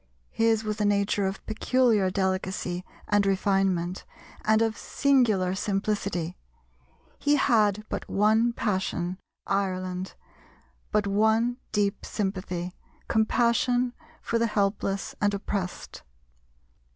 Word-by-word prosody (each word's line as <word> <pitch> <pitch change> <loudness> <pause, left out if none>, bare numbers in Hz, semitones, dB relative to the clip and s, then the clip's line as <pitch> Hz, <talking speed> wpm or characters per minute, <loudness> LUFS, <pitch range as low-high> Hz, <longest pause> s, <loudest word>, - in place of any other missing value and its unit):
His 225 -1 +2
was 215 0 -3
a - - +2
nature 200 -1 +2
of 190 0 -5
peculiar 220 -3 +2
delicacy 185 -1 -1 0.3
and 205 -1 +4
refinement 195 -2 +1 0.4
and 220 +1 +4
of 225 -1 0
singular 225 -10 +2
simplicity; 195 -3 -1 0.8
he 290 0 +3
had 215 -7 +3
but - - -5
one 220 +4 +3
passion, 185 -4 -2 0.3
Ireland, 185 -1 -2 0.8
but 210 -1 +2
one 220 +4 +2
deep 205 -2 0
sympathy 185 -3 -3 0.3
compassion 240 +2 +2 0.3
for 230 - 0
the 230 - +2
helpless 200 -2 -1
and 205 -1 +2
oppressed. 195 -2 -4
205 Hz, 105 wpm, -27 LUFS, 190-220 Hz, 0.8 s, and